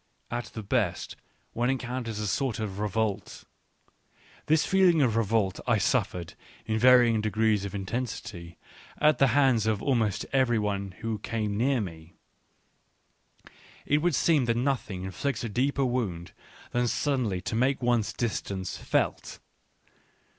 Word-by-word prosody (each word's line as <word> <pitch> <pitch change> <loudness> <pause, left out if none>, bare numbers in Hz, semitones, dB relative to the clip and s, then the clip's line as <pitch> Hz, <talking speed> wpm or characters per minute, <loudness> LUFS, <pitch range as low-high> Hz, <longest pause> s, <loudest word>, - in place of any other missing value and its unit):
At 120 0 -2
the 110 - -8
best 100 -4 -1 0.4
one 120 +2 0
encounters 125 -4 -3
a 105 - -2
sort 120 +3 -1
of 105 -3 -4
revolt. 105 -1 -2 1.0
This 155 0 +3
feeling 185 -4 +4
of 115 -4 +1
revolt, 110 -3 +1
I - - +4
suffered, 85 -2 -1 0.3
in 110 0 -1
varying 120 -2 +6
degrees 110 -1 +1
of 100 - -6
intensity, 100 -4 -5 0.4
at 150 0 +3
the 135 - +6
hands 130 -6 +3
of 110 -2 +1
almost 110 -5 0
every 130 -3 +3
one 100 -2 -2
who 110 -1 -3
came 105 -1 -2
near 125 +3 +1
me; 80 -3 -8 1.7
it 145 - +2
would 170 -1 +1
seem 150 -1 +3
that 115 0 +1
nothing 120 -8 -1
inflicts 110 +6 -3
a 115 - -3
deeper 135 +5 +1
wound 105 -9 -2 0.4
than 120 0 +1
suddenly 120 -8 0
to 90 - -4
make 130 +3 +1
one's 120 -3 +2
distance 100 -6 -3
felt. - - -1
115 Hz, 140 wpm, -28 LUFS, 100-130 Hz, 1.7 s, varying